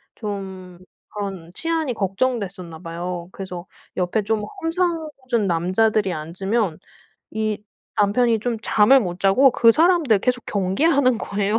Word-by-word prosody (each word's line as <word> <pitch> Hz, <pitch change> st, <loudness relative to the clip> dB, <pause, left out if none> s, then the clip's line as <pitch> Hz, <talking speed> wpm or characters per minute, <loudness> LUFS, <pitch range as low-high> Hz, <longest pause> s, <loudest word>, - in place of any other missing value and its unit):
좀 190 Hz, -4 st, -7 dB, 0.3 s
그런 195 Hz, -5 st, -6 dB
치안이 325 Hz, -, -1 dB
걱정됐었나 195 Hz, -5 st, -2 dB
봐요. 170 Hz, +1 st, -5 dB
그래서 180 Hz, -2 st, -7 dB, 0.3 s
옆에 180 Hz, +4 st, 0 dB
좀 215 Hz, +1 st, -1 dB, 0.2 s
험상궂은 320 Hz, -, -1 dB
남자들이 185 Hz, +4 st, +1 dB
앉으면 185 Hz, +4 st, -2 dB, 0.5 s
이 215 Hz, -1 st, -2 dB, 0.4 s
남편이 220 Hz, +2 st, +3 dB
좀 235 Hz, +1 st, -1 dB
잠을 215 Hz, +6 st, +5 dB
못 180 Hz, -4 st, -4 dB
자고 225 Hz, +8 st, +5 dB
그 230 Hz, -1 st, +6 dB
사람들 320 Hz, -, +4 dB
계속 250 Hz, +3 st, -1 dB
경계하는 250 Hz, -, +2 dB
거예요. 205 Hz, +1 st, -1 dB
210 Hz, 275 characters per minute, -22 LUFS, 185-250 Hz, 0.5 s, 그